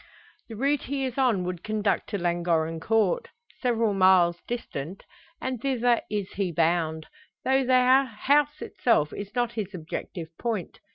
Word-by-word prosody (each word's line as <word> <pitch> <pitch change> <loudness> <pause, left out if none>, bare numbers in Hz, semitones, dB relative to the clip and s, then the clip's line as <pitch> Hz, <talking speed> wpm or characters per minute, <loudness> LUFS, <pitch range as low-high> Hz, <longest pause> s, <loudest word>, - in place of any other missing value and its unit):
The 225 - -7
route 275 +5 0
he 270 0 -2
is 255 0 -4
on 235 -8 +2
would 180 -1 -4
conduct 215 -1 -1
to 205 - -2
Llangorren 170 -2 0
Court 215 +1 +1 0.3
several 230 -4 +1
miles 185 -3 +4
distant 190 - -5 0.4
and 255 -3 -3
thither 245 -3 +2
is 205 -2 -3
he 190 -3 -2
bound; 160 -1 +1 0.4
though 265 +1 +3
the 255 +1 +5
house 285 +6 +1
itself 155 -11 +1
is 205 +1 -7
not 240 -1 +1
his 205 -4 -5
objective 165 0 -6
point. 225 -7 -3
210 Hz, 150 wpm, -26 LUFS, 175-250 Hz, 0.4 s, the